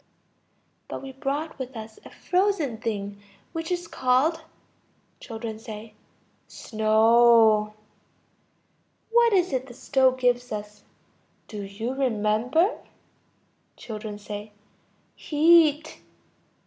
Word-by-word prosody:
But - - -7
we 270 - -7
brought 285 +3 -4
with 260 -1 -6
us 220 0 -9
a - - -12
frozen 360 - 0
thing 205 -3 -4 0.3
which 325 +1 -4
is 350 -1 -2
called... 275 +5 +1 0.8
Children. 225 -2 -7 0.9
Snow. 220 -1 +4 1.4
What 470 0 +5
is 370 -5 +2
it 260 0 -2
the 240 - -12
stove 260 0 +2
gives 245 -1 +1
us? 210 0 -6 0.7
Do 210 -2 -7
you 205 +5 -5
remember? 250 - +1 1.0
Children. 215 -2 -7 1.0
Heat. 310 0 +3
250 Hz, 90 wpm, -25 LUFS, 220-310 Hz, 1.4 s, What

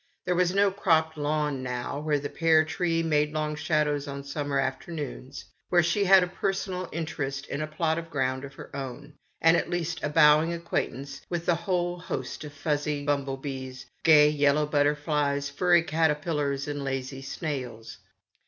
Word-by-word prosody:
There 180 - +1
was 180 0 +2
no 200 +1 +3
cropped 160 -5 +2
lawn, 150 -2 -1 0.4
where 150 -1 +1
the 145 0 -4
pear 160 0 +3
tree 165 0 0
made 150 -2 +1
long 155 0 -1
shadows 150 -1 0
on 140 0 -6
summer 140 0 -2
afternoons, 135 0 -4 0.2
where 175 -2 +4
she 185 +5 +1
had 190 -1 +7
a - - -1
personal 190 -1 -3
interest 145 -4 -4
in 140 - -4
a 155 - -2
plot 160 +1 0
of 165 0 -9
ground 130 -2 -1
of 135 -1 -9
her - - -10
own, 140 +2 -7 0.3
and 165 +1 +6
at - - 0
least 175 -1 -2
a 150 - -1
bowing 150 +2 +5
acquaintance 140 -5 -3
with 170 -1 -3
a 175 - +5
whole 175 +1 -1
host 180 - -5
of 150 - -8
fussy 145 0 -2
bumble 140 -2 0
bees, 130 -2 -6 0.2
gay 150 -2 +7
yellow 150 0 +3
butter 145 0 +2
flies, 145 -1 -1
furry 175 +2 +3
caterpillars, 150 -3 0
and 145 -1 -3
lazy 135 0 -4
snails. 125 -6 -5
150 Hz, 170 wpm, -27 LUFS, 140-165 Hz, 0.4 s, had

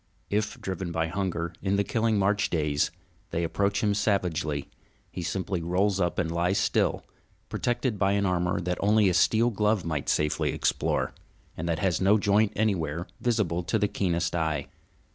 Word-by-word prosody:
If, 105 +3 -1
driven 95 -4 -4
by 80 -1 -1
hunger 85 -2 -2
in 100 0 +1
the 100 - +2
killing 115 0 +1
March 100 +1 +2
days, 75 -3 +1 0.4
they 85 - -1
approach 100 +5 0
him 105 -1 +3
savagely, 90 -8 0 0.4
he - - -5
simply 95 +1 -2
rolls 95 +4 +1
up 90 -2 0
and 80 - 0
lies 90 +3 +1
still, - - +1 0.4
protected 120 -3 -1
by 100 0 +3
an 100 0 +1
armor 90 -1 +1
that 90 0 -2
only 105 0 +4
a - - +1
steel 115 +6 +3
glove 105 -3 +1
might 80 -4 -2
safely 75 0 +1
explore, - - 0 0.4
and 85 +2 -4
that 80 - +1
has 90 +1 0
no 100 +3 +5
joint 105 +1 +3
anywhere 85 -6 0
visible 105 -8 0
to 110 - +1
the 105 -1 +2
keenest 85 -4 -1
eye. 80 -3 -1
95 Hz, 170 wpm, -27 LUFS, 85-105 Hz, 0.4 s, no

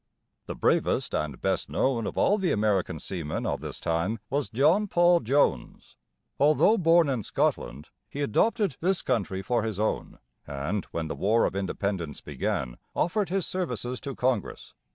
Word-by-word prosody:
The - - -5
bravest - - +1
and 75 -4 -2
best - - -1
known 120 -4 0
of - - -6
all 205 +2 +3
the 190 -2 +1
American 105 -6 +1
seamen 80 -1 -4
of - - -2
this - - -6
time 85 +7 -1
was 140 0 0
John 155 - +3
Paul 175 -1 +4
Jones. 120 - 0 0.4
Although 155 +10 +4
born 165 -1 +5
in 130 -5 -1
Scotland, 70 -7 -2 0.2
he 145 - -5
adopted 195 - +1
this 185 +2 +1
country 100 -6 -1
for 120 +3 +1
his 110 -3 -3
own, 110 - -2 0.3
and, 70 +8 -3
when 80 -1 -4
the - - -3
War 110 +4 +2
of - - -2
Independence 95 -4 -3
began, - - -3 0.2
offered 195 +4 0
his 190 -1 0
services 125 - -3
to 140 -3 -5
Congress. 125 -5 -2
115 Hz, 160 wpm, -27 LUFS, -, 0.4 s, born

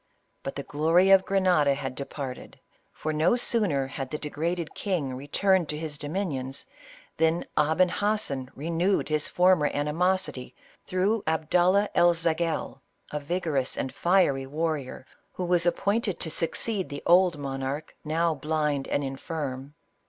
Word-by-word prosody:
But 135 - -5
the 140 - -4
glory 165 +7 +3
of 190 -1 +6
Grenada 180 -8 +3
had 135 -2 -4
departed, 135 -1 -7 0.3
for, 155 - -4
no 155 +9 +3
sooner 205 - +2
had 135 -1 -6
the 150 - -3
degraded 160 +3 -3
king 170 -10 -2
returned 170 +6 +1
to 150 - -3
his 150 -2 -5
dominions, 145 -5 -4 0.5
than 160 +1 +1
Aben 160 +5 +3
Hassen 180 -10 0
renewed 170 +7 0
his 155 -1 +1
former 180 -4 +3
animosity 160 -1 -1 0.3
through 195 +4 +1
Abdallah 175 +5 +2
El 175 0 +4
Zagel, 165 0 -1 0.3
a 150 - -2
vigorous 150 -3 -1
and 130 - -3
fiery 170 -7 +2
warrior, 150 -3 -3 0.3
who 180 - -3
was 175 -1 +2
appointed 200 +3 0
to 160 - -2
succeed 190 +5 -1
the 145 - -7
old 175 -2 +5
monarch 135 +1 -4
now 165 +2 +1
blind 150 -1 -1
and 145 - -1
infirm. 135 0 -5
160 Hz, 135 wpm, -27 LUFS, 140-180 Hz, 0.5 s, of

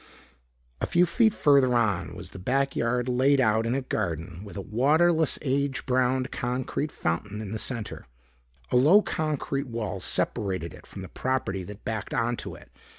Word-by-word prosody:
A - - 0
few 175 +1 +4
feet 225 +4 +3
further 140 -8 +4
on 100 -9 0
was - - -9
the 95 - -9
backyard 125 +1 0
laid 130 +3 +3
out 110 -2 +2
in 120 - 0
a 135 - -1
garden 85 -6 -3
with 100 -1 -9
a - - -3
waterless 155 - +3
age 140 -1 0
browned 130 0 +1
concrete 130 +4 -2
fountain 100 +6 -3
in 105 -3 -6
the 110 - -3
center. 115 -3 -5 0.6
A - - +4
low 165 +12 +6
concrete 145 -3 -2
wall 115 -4 -4
separated 95 -3 0
it - - -14
from 95 - -8
the - - -7
property 115 -8 -2
that 100 +1 -11
backed 110 -3 -3
onto 120 +1 -2
it. - - -16
125 Hz, 165 wpm, -27 LUFS, 105-135 Hz, 0.6 s, low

